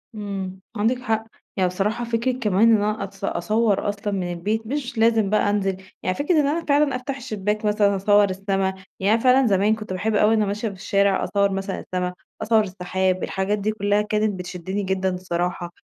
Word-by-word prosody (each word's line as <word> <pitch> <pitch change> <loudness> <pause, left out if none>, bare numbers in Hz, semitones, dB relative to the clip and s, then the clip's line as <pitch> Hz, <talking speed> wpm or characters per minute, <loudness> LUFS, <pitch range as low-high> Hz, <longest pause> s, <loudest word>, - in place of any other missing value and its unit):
إمم 195 -3 -5 0.2
عندِك 225 +5 +1
حق 220 -3 0 0.3
يعني 185 -1 +2
بصراحة، 210 +6 -1
فكرة 235 +2 0
كمان 225 -3 +2
إن - - +7
أنا 215 +1 -1
أتص 195 0 -10
أصور 215 -1 +1
أصلًا 205 0 -3
من 180 -2 -2
البيت 210 +6 -2
مش 255 -2 -4
لازم 225 -2 +3
بقى 210 0 +2
أنزل، 195 -2 0 0.3
يعني 185 - 0
فكرة 295 +5 +1
إن 295 -2 +3
أنا 330 +3 -1
فعلًا 285 -2 +3
أفتح 265 +2 -4
الشباك 215 -4 -3
مثلًا 210 -1 +3
أصور 205 +1 +4
السما، 195 0 -1 0.3
يعني 200 +3 +3
أنا 225 - +2
فعلًا 255 0 +5
زمان 205 +1 +3
كنت 215 -3 -7
باحب 215 +4 -1
أوي 210 +1 +4
وأنا 215 -1 +3
ماشية 205 +3 -2
في 205 - -4
الشارع 195 0 +1
أصور 200 0 +1
مثلًا 195 0 -3
السما، 180 0 -3 0.3
أصور 220 0 +3
السحاب، 185 -1 -1
الحاجات 200 +2 -1
دي 210 +2 0
كلها 205 -1 +1
كانت 210 -2 -1
بتشدني 180 +2 -4
جدًا 190 0 0
بصراحة، 175 -1 -3
205 Hz, 195 wpm, -23 LUFS, 190-220 Hz, 0.3 s, إن